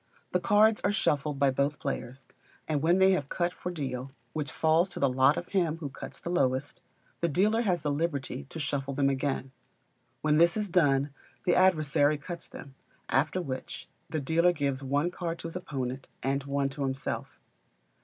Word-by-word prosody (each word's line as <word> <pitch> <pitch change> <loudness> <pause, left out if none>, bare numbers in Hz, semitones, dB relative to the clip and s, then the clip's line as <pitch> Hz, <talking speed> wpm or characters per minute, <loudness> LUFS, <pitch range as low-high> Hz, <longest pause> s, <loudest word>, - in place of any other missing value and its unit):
The 180 - +2
cards 210 +4 +4
are 200 - +3
shuffled 150 -7 0
by 140 -1 +3
both 140 +2 0
players, 135 -1 -5 0.4
and 150 -3 0
when 170 +4 +4
they 190 0 +6
have 145 -7 0
cut 175 0 0
for - - -5
deal 135 -5 -4 0.2
(which 150 -3 -3
falls 160 +3 +3
to - - -7
the 140 - +4
lot 130 +4 +4
of 175 - -5
him 170 -5 +1
who 155 -4 -5
cuts 135 - -9
the 170 - -5
lowest), 135 -4 0 0.4
the 170 - +1
dealer 210 +9 +2
has 185 -7 0
the 145 - 0
liberty 145 -4 -2
to 140 - -9
shuffle 140 -2 -2
them 140 0 +3
again. 135 -1 -2 0.7
When 150 0 +3
this 170 +4 +5
is 210 -2 -1
done, 145 -5 +3 0.3
the 175 - +4
adversary 155 -5 +3
cuts 170 +4 -7
them; 140 - -11 0.4
after 150 +7 +2
which, 130 -4 -6 0.2
the 155 - -1
dealer 165 +5 +3
gives 140 -4 -1
one 145 +5 0
card 170 -2 -4
to 165 - -6
his 165 - -8
opponent, 135 -6 -4 0.2
and 135 +1 0
one 140 0 0
to 140 +1 -7
himself. 135 -1 -3
145 Hz, 185 wpm, -29 LUFS, 135-175 Hz, 0.7 s, they